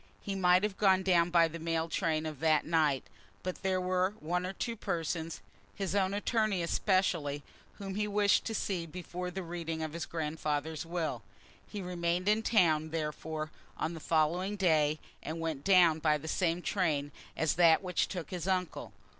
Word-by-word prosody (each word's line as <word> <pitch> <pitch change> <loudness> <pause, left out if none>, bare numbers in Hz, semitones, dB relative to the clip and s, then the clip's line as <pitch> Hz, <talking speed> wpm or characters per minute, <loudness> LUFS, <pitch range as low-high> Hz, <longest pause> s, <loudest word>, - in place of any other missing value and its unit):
He 200 - -3
might 180 -1 +4
have 210 -2 -1
gone 190 -2 +4
down 175 -2 +3
by 170 -1 +5
the 165 +1 -7
mail 165 0 -1
train 160 -2 0
of 155 -3 -5
that 155 -1 +3
night, 155 -5 +2 0.4
but 185 0 -4
there 190 -1 +1
were 185 +2 0
one 180 +3 -1
or 190 - -4
two 235 +3 -3
persons, 165 -4 -3 0.3
his 195 -3 -2
own 195 -1 +1
attorney 210 -3 +1
especially, 170 -6 +1 0.3
whom 195 -2 -6
he 210 +1 -1
wished 205 0 +3
to 225 - -2
see 180 -5 -2
before 180 +2 -5
the 190 +1 -5
reading 165 -2 -4
of 155 -1 -4
his 170 - -4
grandfather's 155 0 -3
will. 160 -8 -2 0.5
He 205 -2 -6
remained 175 +1 -1
in 215 +1 +4
town, 160 -9 +3
therefore, 155 0 -4 0.3
on 165 - -2
the 165 - -7
following 170 +6 +1
day, 155 -5 +2 0.2
and 160 +2 -5
went 160 -4 -3
down 175 -5 +5
by 155 -1 +3
the 155 +2 -9
same 175 +1 0
train 150 -7 0 0.3
as 160 -1 +2
that 170 0 +5
which 180 -2 0
took 175 -6 -6
his 180 -1 -4
uncle. 185 -3 -2
170 Hz, 180 wpm, -31 LUFS, 160-185 Hz, 0.5 s, by